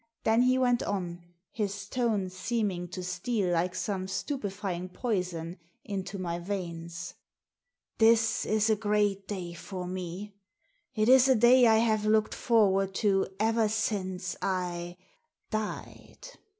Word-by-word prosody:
Then 225 +2 +4
he 255 +1 +4
went 245 -2 +2
on, 175 -3 -3 0.3
his 200 -2 -3
tone 215 -6 0
seeming 190 -2 -2
to 180 +1 -6
steal 185 +1 -1
like 180 +2 0
some 190 -1 -2
stupefying 195 - -3
poison 180 -5 -3 0.3
into 195 0 -4
my 175 -2 -3
veins. 170 -2 -5 0.9
This 225 0 +4
is 215 +1 +2
a - - +4
great 205 -2 0
day 180 -4 -5
for 180 +1 -6
me. 185 +3 -6 0.6
It 215 -1 +2
is 260 +1 +7
a 260 - +6
day 240 +2 +6
I 220 -1 +5
have 220 -2 +2
looked 215 0 +3
forward 195 -5 +2
to 195 -2 +2
ever 225 0 +2
since 190 -4 -2
I 175 -2 -2 0.3
— 470 - -49
died. 215 - -5
200 Hz, 135 wpm, -29 LUFS, 180-220 Hz, 0.9 s, is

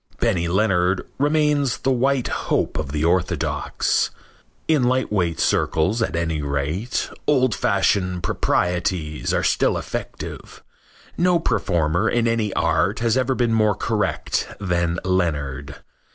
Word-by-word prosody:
Benny 95 -8 +1
Leonard 95 -1 +1
remains 145 -3 +2
the 135 - 0
white 130 0 +1 0.2
hope - - 0
of 75 -3 -4
the 75 +1 -1
orthodox. 90 +1 0 0.6
In 150 -6 +3
lightweight 105 -10 0
circles, 95 +9 +1
at 115 - -1
any 80 -2 -1
rate, 75 - -2 0.2
old 130 -5 +3
fashioned 95 -3 +1
proprieties 85 -3 -1
are - - 0
still - - +2
effective. - - -7 0.6
No 180 0 +4
performer 85 - +1
in 120 -1 +1
any 115 -3 0
art - - +1
has 115 -1 +1
ever 130 0 +1
been 120 -2 +1
more 110 -2 +3
correct - - -1
than 85 -3 0
Leonard. 75 -6 -1
95 Hz, 125 wpm, -22 LUFS, 85-120 Hz, 0.6 s, No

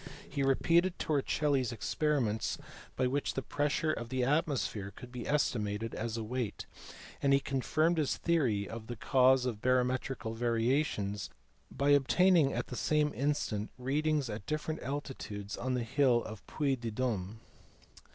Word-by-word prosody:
He 140 - -3
repeated 170 +7 +3
Torricelli 145 -2 +1
s 125 - -2
experiments, 120 -3 0 0.4
by 130 - +1
which 135 +3 -1
the 135 - -2
pressure 145 +4 0
of 115 0 -5
the 130 0 -1
atmo 145 +3 +2
sphere 100 -4 -3
could 120 +5 -12
be 125 -1 -6
estimated 115 -6 0
as 115 +1 -3
a 115 - -3
weight, 120 -1 -3 0.6
and 140 0 +3
he 140 - +5
confirmed 155 +5 +1
his 150 - 0
theory 125 - +1
of 110 -1 -7
the 120 - -5
cause 130 +2 +4
of 115 -4 -3
barometrical 125 -2 0
variations 115 -3 0 0.4
by 140 +1 0
obtaining 150 +2 +5
at - - -2
the 125 - -7
same 150 +2 +1
instant 125 -6 -1
readings 145 +2 0
at 105 -2 -6
different 155 +1 -2
altitudes 125 -7 -5
on 130 +1 -2
the 125 - -1
hill 125 0 +3
of 110 -2 -8
Puy 140 -3 0
de 120 -2 -5
D6me. 110 -4 -2
130 Hz, 155 wpm, -32 LUFS, 115-145 Hz, 0.6 s, he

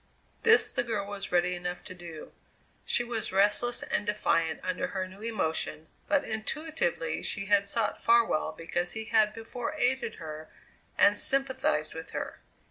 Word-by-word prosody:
This 440 -1 +5
the - - +2
girl 225 -4 -2
was 200 -1 -6
ready 180 0 +3
enough 180 0 -4
to - - -9
do. 170 -3 -9 0.5
She 240 - +2
was 235 -2 -3
restless 205 +5 +2
and - - 0
defiant 165 -6 +1
under 185 0 -1
her 190 -1 -3
new 190 +2 -13
emotion, 160 -7 -2 0.2
but 290 -1 +3
intuitively 310 - -2
she 200 -3 -2
had 200 0 +4
sought 220 0 -1
Farwell 230 -9 +4
because 170 +2 -3
he 220 0 -4
had 215 -2 +4
before 230 +5 -5
aided 255 -4 +1
her 155 -1 -8 0.5
and 205 - +6
sympathized 270 +4 0
with - - -8
her. - - -4
210 Hz, 155 wpm, -29 LUFS, 180-240 Hz, 0.5 s, and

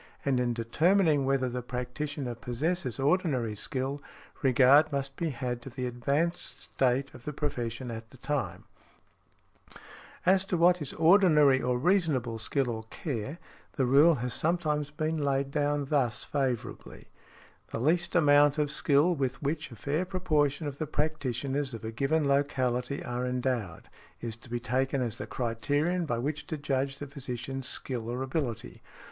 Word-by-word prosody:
And 135 -2 +2
in 120 -1 0
determining 155 - +3
whether 135 -1 +1
the 125 0 -3
practitioner 125 +2 -4
possesses 130 +4 -2
ordinary 135 - +1
skill, 135 +6 -3 0.4
regard 135 +4 +5
must 135 -1 -3
be 165 +2 -1
had 125 -3 -3
to 135 - -8
the 125 0 -4
advanced 140 +8 -1
state 135 +1 0
of 120 - -13
the 150 - -4
profession 125 -4 -3
at 110 0 -7
the 130 - -16
time. 145 +2 -3 1.6
As 190 +1 +5
to 185 - -1
what 175 +1 +4
is 145 - -4
ordinary 160 -6 +5
or 125 0 +1
reasonable 140 - +1
skill 125 +2 0
or 110 -1 -4
care, 135 0 -4 0.4
the 135 - +1
rule 145 +6 +6
has 125 -2 -3
sometimes 155 -2 0
been 155 +1 -2
laid 140 -1 0
down 145 -1 0
thus 135 -5 0
favourably, 130 -5 -3 0.6
"The - - -5
least 170 +7 +1
amount 145 -2 +5
of 150 -1 +1
skill 150 +3 +3
with 135 -4 -2
which 150 +3 -2
a 120 - -10
fair 145 +9 -1
proportion 155 -5 0
of 140 -1 -5
the 155 - -2
practitioners 140 -3 -2
of 115 - -8
a 110 - -3
given 140 +6 +1
locality 135 -2 0
are 125 +1 -2
endowed, 125 -8 -2 0.3
is 115 -2 -4
to 120 - -14
be 120 0 -2
taken 130 +3 0
as 120 -3 -2
the - - -5
criterion 145 +9 -1
by 120 - 0
which 145 +5 -3
to 155 - -3
judge 135 -1 -1
the 145 - -6
physician's 135 -1 -5
skill 120 -4 -4
or 125 +2 -2
ability". 135 -4 -3
140 Hz, 160 wpm, -29 LUFS, 125-150 Hz, 1.6 s, rule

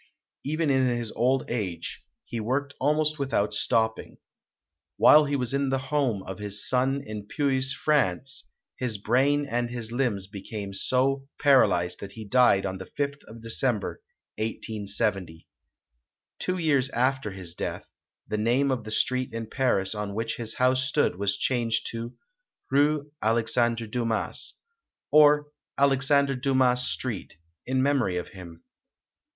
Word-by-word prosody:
Even 155 +1 0
in 130 -1 +3
his 120 -2 -2
old 130 +2 +1
age, 95 -8 -4 0.2
he 115 - -5
worked 135 +6 -2
almost 150 +2 +1
without 130 -7 0
stopping. 110 +1 0 0.8
While 150 0 +7
he 145 0 -1
was 125 -2 -1
in 140 -1 +1
the 135 - +1 0.2
home 125 -10 +1
of 95 +1 -7
his 105 0 0
son 135 +2 +1
in 105 -1 -7
Puys, 135 0 0
France, 135 - 0 0.3
his 120 -4 -1
brain 135 +7 +2
and 120 -2 -1
his 120 -2 -5
limbs 120 -6 -1
became 100 0 -7
so 135 +6 +1
paralyzed 95 - +3
that 100 0 -8
he 110 -1 -8
died 110 -3 +4
on 95 -1 -4
the 95 - -8
fifth 140 0 -3
of 115 +1 -12
December, 115 - -1 0.4
1870. 105 -5 -3 0.9
Two 185 0 -1
years 145 -6 +2
after 130 -2 0
his 95 -4 -8
death, - - -5 0.4
the 105 - -2
name 125 +5 +2
of 120 -4 -2
the - - -6
street 130 +3 0
in 115 0 -4
Paris 110 -6 +1
on 105 -1 -4
which 115 +1 -2
his 115 -2 -4
house 130 0 +2
stood 130 -7 +1
was 100 0 0
changed 120 -3 0
to 115 +1 -6 0.6
"Rue 145 +1 +2
Alexandre 115 +1 +1
Dumas", 115 0 -2 0.6
or 150 -1 +6 0.3
Alex 135 -1 +3
ander 140 -1 +4
Dumas 130 -1 +2
Street, 115 -9 -4 0.3
in 130 0 +1
memory 130 -10 +1
of 90 - -4
him. 85 -3 -12
120 Hz, 145 wpm, -26 LUFS, 105-135 Hz, 0.9 s, While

